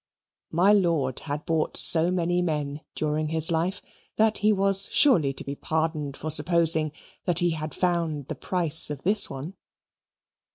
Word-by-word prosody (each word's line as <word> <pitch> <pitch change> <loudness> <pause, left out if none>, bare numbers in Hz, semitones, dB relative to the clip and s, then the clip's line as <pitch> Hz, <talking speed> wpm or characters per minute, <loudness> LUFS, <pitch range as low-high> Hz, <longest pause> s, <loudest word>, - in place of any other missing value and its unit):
My 185 +5 +3
lord 165 -10 0
had 150 0 -6
bought 160 -1 -2
so 165 +1 +5
many 175 -1 -1
men 150 -3 -3
during 155 0 -2
his 160 +1 +2
life 175 +4 -2 0.3
that 220 0 +1
he 215 0 +2
was 195 -1 +3
surely 220 - +3
to - - -5
be 140 - -6
pardoned 155 -2 -3
for 155 - -5
supposing 160 0 +2 0.3
that 175 -3 0
he 175 -1 +3
had 155 -1 -6
found 165 -6 -2
the - - -5
price 165 -5 +1
of 145 -2 -7
this 205 +3 +4
one. 140 +7 -8
160 Hz, 160 wpm, -25 LUFS, 150-180 Hz, 0.3 s, so